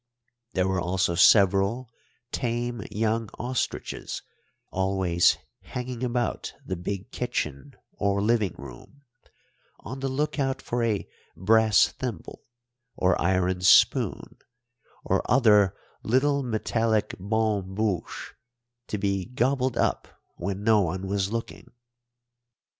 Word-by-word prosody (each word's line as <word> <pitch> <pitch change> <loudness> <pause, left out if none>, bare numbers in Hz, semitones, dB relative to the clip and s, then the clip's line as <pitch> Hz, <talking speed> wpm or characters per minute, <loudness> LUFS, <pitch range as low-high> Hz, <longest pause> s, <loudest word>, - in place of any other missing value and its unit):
There 95 0 +1
were 95 -1 0
also 90 0 0
several 100 +6 +4 0.4
tame 120 -1 -2
young 110 +1 -1
ostriches, 125 +1 -3 0.5
always 95 -2 +2 0.2
hanging 125 0 -6
about 120 -1 -2
the 95 - -3
big 95 +2 -5
kitchen 70 0 -4 0.2
or 100 0 0
living 105 -3 +1
room 70 - -12 0.8
on 130 +5 -7
the 135 0 -2
look 150 +3 -1
out 135 -1 0
for 120 0 -2
a 110 -3 -1 0.3
brass 110 +2 +4
thimble, 120 -10 -6 0.5
or 90 0 +2
iron 90 0 +1
spoon, 95 - +4 0.7
or - - +2
other 105 -6 +4 0.2
little 140 +4 +2
metallic 115 -2 0
bonne 100 -1 -1
bouche 105 -5 -2 0.5
to 105 - -3
be 100 -2 -1
gobbled 125 0 0
up - - 0 0.3
when 95 +2 -4
no 110 -1 +5
one 95 +1 -2
was 100 0 -1
looking. 115 0 -5
105 Hz, 110 wpm, -26 LUFS, 95-120 Hz, 0.8 s, no